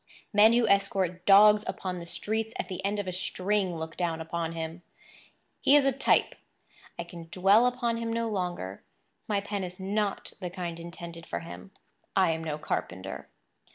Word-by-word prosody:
Men 215 +2 +7
who 235 -1 +3
escort 190 -3 +1
dogs 210 +1 +8
upon 180 -1 -4
the 170 - -9
streets 220 +5 -3
at - - -4
the 185 -1 -5
end 200 +2 0
of 205 -2 -3
a - - -1
string 185 +1 -1
look 160 0 -6
down 170 -2 -1
upon 165 0 -3
him. 165 +1 -5 0.8
He 280 - +5
is 290 -2 +6
a 275 - +4
type; 270 +1 +2 0.6
I - - -3
can 170 -1 -10
dwell 195 +7 +5
upon 240 -2 0
him 230 0 -3
no 230 0 0
longer; 180 - -3 0.5
my 205 -2 +1
pen 200 -1 -3
is 180 0 -7
not 200 +1 -2
the 180 -2 -4
kind 175 -2 -5
intended 170 -1 -9
for - - -3
him; 170 +3 -10 0.5
I 185 -3 +5
am 160 0 -3
no 155 -2 -3
carpenter. 95 -9 -4
185 Hz, 180 wpm, -28 LUFS, 170-210 Hz, 0.8 s, dogs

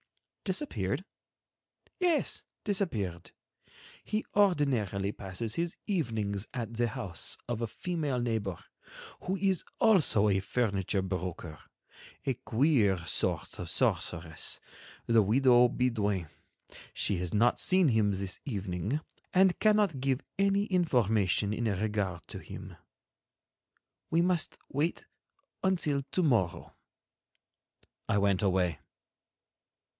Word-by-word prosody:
"Disappeared?" 180 - 0 0.9
"Yes, 350 -4 +1 0.2
disappeared. 110 - -1 0.7
He 215 +1 -2
ordinarily 130 - +2
passes 105 +4 -4
his 170 0 -2
evenings 110 - -1
at 115 -2 -4
the 120 +1 +1
house 110 -8 -3
of 120 -1 -3
a 115 - 0
female 155 - -2
neighbor, 110 -7 -1 0.6
who 190 +2 -2
is 190 -2 +1 0.2
also 160 - +5
a 95 -2 +3
furniture 100 -2 0
broker, 90 -4 -4 0.7
a 135 - +1
queer 115 - +2
sort - - 0
of - - -5
sorceress, 80 -2 -1 0.5
the 115 -1 +5
widow 120 +3 +5
Bidoin. 105 -9 0 0.7
She 100 - +1
has 90 -1 -2
not 115 +3 +3
seen 185 -4 +4
him 110 -3 +3
this 95 -1 -3
evening 100 - -2 0.4
and 190 -1 +5
cannot 210 -9 +3
give 135 0 +1 0.2
any 200 +1 +3
information 110 - +2
in 115 +2 -2
regard 100 -3 -1
to - - -6
him. - - -9 1.3
We 165 - +3
must 175 -3 +1
wait 150 +5 -1 0.6
until 170 -7 +1
to 185 - +1
morrow." 115 - 0 1.3
I 105 - +3
went 100 -2 +2
away. 90 -5 +1
115 Hz, 110 wpm, -30 LUFS, 100-165 Hz, 1.3 s, also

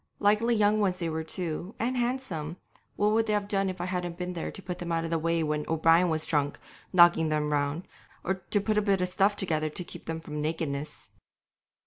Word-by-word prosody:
Likely 215 +3 +3
young 210 0 +3
ones 190 -3 +1
they 170 -2 -2
were 160 0 -2
too, 170 +3 -4
and 245 +3 -1
handsome, 240 - -2 0.4
what 210 +1 +2
would 225 +1 +2
they 210 - +1
have 205 -1 0
done 195 -1 +1
if 185 -1 -6
I 175 - -2
hadn't 180 -2 -3
been 180 0 -4
there 170 - -4
to - - -8
put 180 -1 -5
them 175 -1 -4
out 165 0 0
of 165 - -4
the 165 - +1
way 165 0 +1
when 150 -1 -1
O'Brien 165 +2 +4
was 155 -1 +1
drunk, 145 -2 0 0.3
and - - -35
knocking 175 -3 +6
them 150 -1 0
round, 145 +3 -1 0.4
or 190 - +1
to 190 +2 -1
put 210 +1 +1
a - - +1
bit 200 -2 +1
of 180 - 0
stuff 195 +3 +2
together 155 -6 -1
to 165 +4 -4
keep - - -10
them 160 0 -3
from 150 -2 -5
nakedness? 150 -2 -3
175 Hz, 235 wpm, -28 LUFS, 160-200 Hz, 0.4 s, knocking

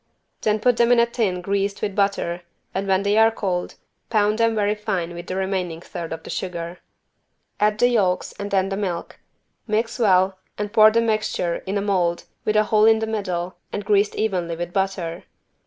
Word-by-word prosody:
Then 215 0 +1
put 245 +1 +2
them 235 0 +4
in 245 - +6
a 235 - +6
tin 215 -7 -1
greased 200 +1 -1
with 205 -2 -2
butter 195 -4 0 0.3
and 195 +1 -2
when 190 0 +2
they 205 +1 +2
are 225 0 +7
cold, 185 -5 -3 0.3
pound 215 -1 +2
them 230 -1 +3
very 205 -1 +2
fine 185 -5 -3
with 175 0 -8
the 185 - -3
remaining 190 -3 -2
third 170 -1 -7
of 160 0 -5
sugar. 175 -1 -5 0.8
Add 210 0 +2
the 245 - +4
yolks 195 -7 +1
and 200 0 -4
then 195 -1 +1
the 195 - -2
milk, 185 -4 -4 0.5
mix 225 +2 -1
well 190 -3 +3 0.2
and 210 0 -4
pour 215 0 +8
the 230 +1 +2
mixture 215 -6 0
in 195 +2 -1
a - - 0
mold 180 -4 0 0.2
with 215 - +1
a 215 - +5
hole 215 0 +3
in 220 0 +6
the 220 - -1
middle 185 -5 -3
and 205 - -4
greased 205 0 +2
evenly 180 -6 -1
with 175 +1 -5
butter. 190 -3 -2
200 Hz, 195 wpm, -22 LUFS, 180-215 Hz, 0.8 s, pour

